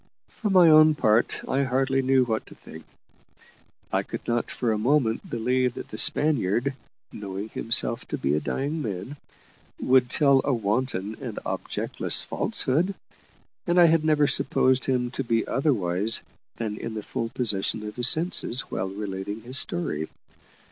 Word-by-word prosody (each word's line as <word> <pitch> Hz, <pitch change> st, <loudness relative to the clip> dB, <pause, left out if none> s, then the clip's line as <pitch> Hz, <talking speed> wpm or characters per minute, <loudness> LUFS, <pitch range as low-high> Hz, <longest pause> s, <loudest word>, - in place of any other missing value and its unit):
For 215 Hz, -, -4 dB
my 185 Hz, -3 st, +6 dB
own 155 Hz, -1 st, +6 dB
part, 110 Hz, -4 st, +1 dB
I 135 Hz, -, 0 dB
hardly 135 Hz, 0 st, 0 dB
knew 130 Hz, 0 st, +3 dB
what 110 Hz, -2 st, -3 dB
to -, -, -13 dB
think. 80 Hz, -, -13 dB, 1.1 s
I -, -, +2 dB
could -, -, -8 dB
not 120 Hz, 0 st, -1 dB
for 120 Hz, -3 st, -2 dB
a 110 Hz, -, 0 dB
moment 120 Hz, -1 st, 0 dB
believe 125 Hz, +1 st, 0 dB
that -, -, -8 dB
the 110 Hz, -, -8 dB
Spaniard, 135 Hz, -3 st, +3 dB, 0.4 s
knowing 100 Hz, +1 st, -7 dB
himself 115 Hz, +1 st, +1 dB
to -, -, -4 dB
be 70 Hz, -, -1 dB
a 75 Hz, -, +1 dB
dying 145 Hz, -, -3 dB
man, 105 Hz, +4 st, -6 dB, 0.6 s
would 130 Hz, -1 st, +3 dB
tell 140 Hz, -1 st, +3 dB
a -, -, 0 dB
wanton 110 Hz, -1 st, -2 dB
and -, -, -6 dB
objectless -, -, 0 dB
falsehood; 170 Hz, +9 st, 0 dB, 0.7 s
and 175 Hz, +1 st, +3 dB
I 175 Hz, -, +8 dB
had 165 Hz, -1 st, +3 dB
never 155 Hz, -2 st, +3 dB
supposed 130 Hz, -1 st, +3 dB
him 125 Hz, -2 st, -1 dB
to 135 Hz, -, -4 dB
be 115 Hz, -2 st, 0 dB
otherwise 110 Hz, -, 0 dB, 0.3 s
than 110 Hz, -2 st, -4 dB
in 115 Hz, -1 st, -6 dB
the 105 Hz, -, -5 dB
full 115 Hz, +2 st, -4 dB
possession 105 Hz, -2 st, -1 dB
of 105 Hz, 0 st, -7 dB
his 120 Hz, 0 st, +4 dB
senses 155 Hz, -6 st, +1 dB
whilst 95 Hz, +1 st, -4 dB
relating 100 Hz, +1 st, -5 dB
his 130 Hz, +4 st, -2 dB
story. 140 Hz, -, -3 dB
125 Hz, 160 wpm, -25 LUFS, 105-140 Hz, 1.1 s, I